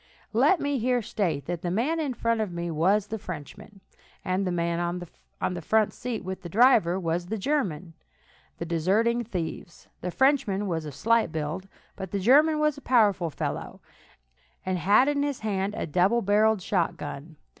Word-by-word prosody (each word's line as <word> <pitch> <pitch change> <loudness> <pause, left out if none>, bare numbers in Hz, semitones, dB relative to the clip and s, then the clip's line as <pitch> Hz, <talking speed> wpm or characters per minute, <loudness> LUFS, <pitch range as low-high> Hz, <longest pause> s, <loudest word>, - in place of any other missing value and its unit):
Let 380 - +4
me 285 -2 -1
here 245 0 +1
state 165 -10 -2
that 175 0 -4
the 175 - -2
man 250 - 0
in 280 -5 -2
front 230 -1 0
of 210 -4 -2
me 170 0 -4
was 190 +6 +2
the 220 +1 -5
Frenchman, 195 +3 -9 0.4
and 185 +1 0
the - - 0
man 170 -1 -1
on 175 +1 -5
the 175 - -5
front 215 +5 +2
seat 245 -4 -5
with 190 0 -5
the 175 - -8
driver 210 -4 +4
was 175 0 -2
the 220 - -3
German, 190 - -2 0.6
the 170 - -4
deserting 200 +9 +1
thieves. 175 -5 -6
The 180 - -3
Frenchman 230 -4 +2
was 160 -4 -3
slight 230 +8 +3
of - - -10
build, 160 +5 -4 0.3
but 190 -1 -6
the 200 - -2
German 295 +10 +5
was 300 -1 +1
a - - -20
powerful 205 -10 +3
fellow, - - -5 0.9
and 185 -1 -1
had 205 - +4
in 290 -1 +1
his 285 -2 -2
hand 200 -1 -2
a - - -3
double 185 +9 +2
barrelled 210 0 +3
shotgun. 160 -4 -3
195 Hz, 175 wpm, -26 LUFS, 175-230 Hz, 0.9 s, German